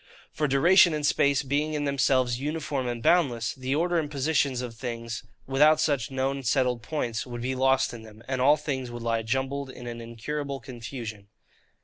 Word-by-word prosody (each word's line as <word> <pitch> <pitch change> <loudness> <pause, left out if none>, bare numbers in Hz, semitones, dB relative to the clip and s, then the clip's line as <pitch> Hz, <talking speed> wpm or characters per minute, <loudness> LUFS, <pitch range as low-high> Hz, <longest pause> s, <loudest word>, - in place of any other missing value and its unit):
For 150 - 0
duration 165 +5 +5
and 150 -1 -2
space 140 -1 +3
being 145 +3 -1
in 145 -1 -1
themselves 130 -3 +2
uniform 145 -2 -2
and 120 -1 -4
boundless, 125 -11 +2
the 130 +1 -2
order 175 +2 +1
and 150 -2 -3
position 145 -1 +1
of 120 -2 -6
things, 115 -1 -5 0.2
without 150 +3 +4
such 140 -7 +1
known 135 +1 -1
settled 125 -1 +1
points, 120 -6 -3
would 120 -1 -6
be 130 +1 -1
lost 130 0 +2
in 120 - -8
them; 110 0 -14
and 130 -1 -1
all 145 +4 +5
things 135 -4 -3
would 120 -1 -7
lie 115 -1 0
jumbled 135 +4 -2
in 125 -1 -10
an 120 -1 -6
incurable 135 +5 -5
confusion. 115 -4 -8
130 Hz, 185 wpm, -27 LUFS, 120-145 Hz, 0.2 s, duration